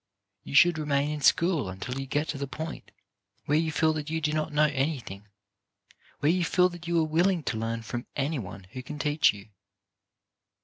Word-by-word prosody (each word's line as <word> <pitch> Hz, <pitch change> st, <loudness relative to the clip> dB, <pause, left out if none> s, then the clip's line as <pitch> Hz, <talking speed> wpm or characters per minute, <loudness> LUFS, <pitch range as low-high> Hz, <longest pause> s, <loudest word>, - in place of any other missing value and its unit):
You -, -, -6 dB
should 175 Hz, +2 st, +6 dB
remain 145 Hz, -1 st, 0 dB
in 150 Hz, -1 st, -4 dB
school 165 Hz, -, +3 dB
until 125 Hz, +8 st, -5 dB
you 135 Hz, -, -5 dB
get 145 Hz, +3 st, 0 dB
to 140 Hz, -, -3 dB
the 140 Hz, -, -3 dB
point 160 Hz, +4 st, -7 dB, 0.6 s
where 150 Hz, +2 st, +3 dB
you 160 Hz, -1 st, 0 dB
feel 155 Hz, 0 st, +2 dB
that 155 Hz, -1 st, -4 dB
you 160 Hz, +1 st, -1 dB
do 150 Hz, -1 st, -1 dB
not 155 Hz, 0 st, -1 dB
know 150 Hz, +1 st, +4 dB
any 145 Hz, 0 st, 0 dB
thing, 100 Hz, -2 st, -10 dB, 0.9 s
where 145 Hz, -, +4 dB
you 180 Hz, 0 st, +1 dB
feel 180 Hz, +2 st, +3 dB
that 175 Hz, -1 st, -10 dB
you 170 Hz, 0 st, +1 dB
are -, -, +3 dB
willing 170 Hz, +2 st, +2 dB
to 110 Hz, -, -2 dB
learn 115 Hz, +1 st, -3 dB
from 120 Hz, +2 st, -5 dB
any 145 Hz, +1 st, -1 dB
one 95 Hz, -2 st, -8 dB
who 130 Hz, -, -6 dB
can 150 Hz, +4 st, -8 dB
teach 150 Hz, +1 st, +3 dB
you. 100 Hz, +1 st, -13 dB
150 Hz, 210 wpm, -28 LUFS, 135-160 Hz, 0.9 s, should